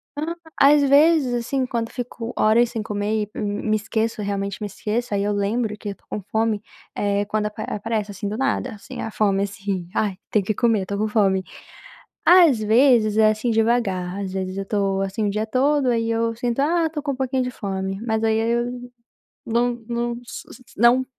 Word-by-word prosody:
Hã, 315 +3 -3 0.2
às 290 +1 +6
vezes, 285 -1 +4
assim, 255 +2 -1
quando 230 -2 -2
eu - - -18
fico 240 -1 -5
horas 225 +2 +4
sem 225 -3 -3
comer 210 +1 -1
e 210 - -8
m 205 +1 -2
me 215 - +3
esqueço, 220 +1 -2
realmente, 200 0 -3
me 210 - -2
esqueço, 220 +3 -3
aí, 200 0 +1
eu 205 - 0
lembro 210 +2 -1
que 205 - -6
eu 200 - -5
tô - - -35
com 210 - -4
fome, 220 -1 +1 0.3
eh, 205 0 0
quando 210 +1 -1
ap 210 - -9
aparece, 215 -1 -2
assim, 200 +1 -5
do 215 +2 -3
nada, 265 -1 0
assim, 205 - -9
a 225 - -4
fome, 200 -2 +1
assim: 195 -3 -4
"Ai, 200 -4 0
tenho 210 -3 +2
que 215 - 0
comer, 225 -5 +2
tô 200 +2 -4
com 215 +1 0
fome". 195 -3 +2 0.8
Às 340 -9 +7
vezes 220 -1 +4
é, 215 0 +6
assim, 215 +3 -1
devagar, 210 -5 0
às 190 -1 -4
vezes, 190 0 -3
eu 195 - -3
tô, 195 -2 0
assim, 195 +2 -1
o - - +1
dia 215 +2 -2
todo, 275 +3 +2
aí, 230 -1 +1
eu 230 0 0
sinto: 240 +1 -1
"Ah, 325 +3 +2
tô 300 -2 -5
com 285 -2 -1
um - - -5
pouquinho 260 0 0
de 250 - -2
fome", 195 -4 -4
mas, 220 0 0
aí, 220 0 +2
eu 235 +1 +1 0.8
não 240 +1 +1
não 235 0 -1
s - - -9 0.3
não 240 +4 +5
220 Hz, 205 wpm, -22 LUFS, 205-240 Hz, 0.8 s, Às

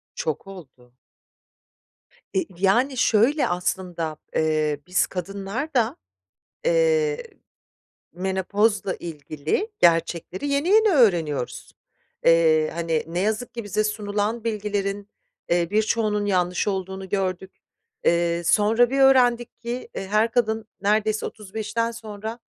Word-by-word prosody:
Çok 485 - -3
oldu. 130 -10 -13 1.4
E, 190 - +2
v - - -2 0.2
yani, 250 +7 +3
şöyle 240 +8 +3
aslında: 175 -3 -2 0.2
Eee, 155 -2 +1
biz 180 - +2
kadınlar 200 - -5
da, 235 -3 +1 0.7
eee, 480 -2 +2 0.9
menopozla 190 +2 0
ilgili 155 - -3
gerçekleri 170 - +1
yeni 280 +4 0
yeni 435 +1 +5
öğreniyoruz. 170 - +1 0.5
Eee, 160 -2 +4
hani, 165 -2 -1
ne 170 +2 -3
yazık 220 +5 -1
ki 235 -1 -5
bize 205 +1 0
sunulan 210 +1 -2
bilgilerin, 205 -2 -2 0.4
eee, 170 -1 +2
birçoğunun 215 -1 +1
yanlış 180 -1 0
olduğunu 190 -1 -3
gördük. 190 -1 -2 0.5
Eee, 170 0 +2
sonra 225 +5 +4
bir 275 +1 0
öğrendik 245 -3 +4
ki, 240 +1 -5
eee, 195 - -4
her 215 +3 +2
kadın 220 -3 0
neredeyse 215 +1 +1
35'ten 220 +2 -3
sonra 220 0 -7
205 Hz, 110 wpm, -24 LUFS, 180-230 Hz, 1.4 s, yeni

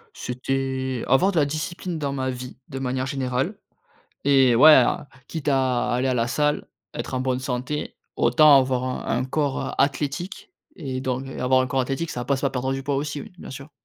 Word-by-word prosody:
C'était 130 0 -2
avoir 180 +10 +4
de 175 - +1
la 145 - +4
discipline 165 +4 -4
dans 140 -3 -2
ma 130 -1 -2
vie 125 0 -6
de 135 - -6
manière 130 0 -2
générale 135 - -2 0.7
et 135 -3 +5
ouais 155 +7 +9
a 145 - +3 0.2
quitte 160 -3 -4
à 130 -3 +1
aller 125 +2 +1
à 130 - +1
la 115 -1 +1
salle, 150 +4 0 0.3
être - - -5
en 130 - 0
bonne 130 -1 0
santé, 130 +3 -3 0.2
autant 150 -3 +6
avoir 130 -1 -1
un 130 -2 -2
un 130 - -1
corps, 140 0 -1
heu, - - -3
athlétique 155 - -1 0.3
et 130 -5 -4
donc 130 0 -2
avoir 130 0 +1
un - - -1
corps 130 +1 0
athlétique 135 +6 -2
ça 120 -6 -4
passe 135 0 0
par 135 -1 0
perdre 130 +1 -1
du 135 - -4
poids 140 0 -1
aussi, 145 0 -3
oui, - - -12
bien - - -9
sûr. 135 +2 -9
135 Hz, 205 wpm, -24 LUFS, 130-145 Hz, 0.7 s, ouais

